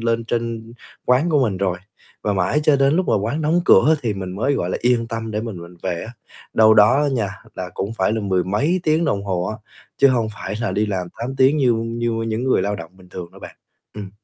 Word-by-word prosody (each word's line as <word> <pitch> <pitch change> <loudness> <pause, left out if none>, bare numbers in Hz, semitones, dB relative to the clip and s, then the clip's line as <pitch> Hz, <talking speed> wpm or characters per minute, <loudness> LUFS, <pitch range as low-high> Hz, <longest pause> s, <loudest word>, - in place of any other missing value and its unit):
lên 115 0 0
trên 115 -1 -3 0.3
quán 130 +7 +3
của 145 -4 +3
mình 105 -6 0
rồi, 95 -2 -1 0.4
và 105 - 0
mãi 95 +10 +1
cho 150 -2 +5
đến 140 +3 +3
lúc 185 - +1
mà - - +3
quán 145 +10 -2
đóng 160 +4 +2
cửa 155 +11 +6
thì 110 -3 -1
mình 95 -2 -5
mới, 135 +7 +1
gọi 90 -8 -2
là, - - -1
yên 120 -1 +2
tâm 115 -1 -4
để 105 - -2
mình 110 -3 -5
mình 85 +1 -12
về 90 -3 -2
á, 115 - -9 0.4
đâu 110 0 +6
đó 115 +7 +5
á 145 - +2
nha, 110 -6 0 0.3
là 90 -1 -5
cũng 100 +3 -3
phải 95 +2 +2
là 110 - -1
mười 95 -3 0
mấy 145 - 0
tiếng 160 0 +2
đồng 100 -8 -1
hồ 90 -2 -1
á, 110 - -4 0.4
chứ 140 - +5
hông 120 -4 +1
phải 105 - -5
là 110 -6 -1
đi 105 +3 +1
làm 95 -3 -2
8 125 +4 -4
tiếng 135 +3 +4
như 130 -5 +3
như 115 +1 -2 0.2
những 110 +3 -2
người 130 - +2
lao 100 +1 -1
động 80 -4 -9
bình 90 -1 -18
thường 90 -2 -8
đâu - - -15
bạn. - - -10 0.4
Ừm. 100 -2 -7
110 Hz, 255 wpm, -21 LUFS, 100-130 Hz, 0.4 s, cửa